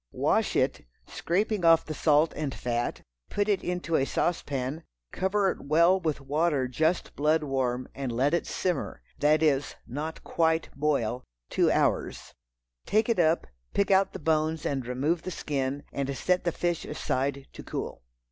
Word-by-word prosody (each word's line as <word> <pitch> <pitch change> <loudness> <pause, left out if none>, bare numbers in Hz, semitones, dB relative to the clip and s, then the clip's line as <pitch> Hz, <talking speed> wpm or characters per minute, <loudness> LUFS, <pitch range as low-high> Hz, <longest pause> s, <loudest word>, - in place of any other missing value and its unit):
Wash - - +1
it, - - +1 0.2
scraping 205 +3 -1
off 165 -1 +6
the 155 - -4
salt 150 +1 +3
and 145 -4 -3
fat; 120 0 -2 0.3
put 205 0 0
it 205 -2 +1
into 180 -2 -2
a 135 - +3
sauce 175 +5 0
pan, 140 +3 -4 0.3
cover 190 0 +1
it - - -8
well 170 +6 +4
with 160 -5 -2
water 145 -1 +1
just 160 +7 0
blood 155 +2 +2
warm, 130 -3 -1
and 135 -2 -4
let 130 +6 +1
it 170 - 0
simmer—that 155 -2 0
is, 145 -2 +1
not 150 +6 -5
quite 160 -1 +1
boil, 135 -5 0 0.3
two - - +3
hours. - - 0 0.5
Take 215 +2 +2
it 230 - +2
up, 165 0 +3 0.3
pick 200 0 +2
out 190 0 +4
the - - -6
bones 155 0 0
and 135 -4 -2
remove 145 +7 0
the 185 - -5
skin, 140 -4 -2
and 140 -1 -2
set 180 0 +1
the 170 - +2
fish 175 0 -1
aside 140 -2 -2
to - - -9
cool. - - -5
155 Hz, 165 wpm, -28 LUFS, 135-170 Hz, 0.5 s, off